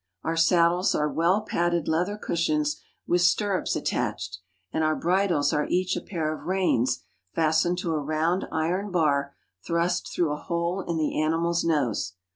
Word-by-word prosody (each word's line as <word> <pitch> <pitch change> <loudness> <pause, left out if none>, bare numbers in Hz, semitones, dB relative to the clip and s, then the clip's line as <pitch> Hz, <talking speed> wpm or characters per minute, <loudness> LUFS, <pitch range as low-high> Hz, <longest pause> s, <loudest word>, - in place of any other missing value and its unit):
Our 165 - -1
saddles 170 +2 +3
are 150 - +1
well 170 +7 +2
padded 175 -4 0
leather 180 +6 0
cushions 300 - -1 0.2
with 175 0 +2
stirrups 190 +2 +2
attached, 95 0 -2 0.3
and 160 - +1
our 155 0 +2
bridles 175 -4 +1
are 150 -1 +1
each 185 +1 0
a - - -3
pair 160 -5 -2
of 155 0 -9
reins 130 -10 +1 0.3
fastened 160 +2 +2
to 170 - -1
a 155 - 0
round 155 +5 0
iron 175 +6 -1
bar 145 -6 +1 0.3
thrust 170 +1 -1
through 165 -4 0
a 150 - -2
hole 170 +2 -2
in 170 -1 -1
the 155 -1 0
animal's 165 +2 +1
nose. 125 - 0
170 Hz, 160 wpm, -26 LUFS, 155-180 Hz, 0.3 s, saddles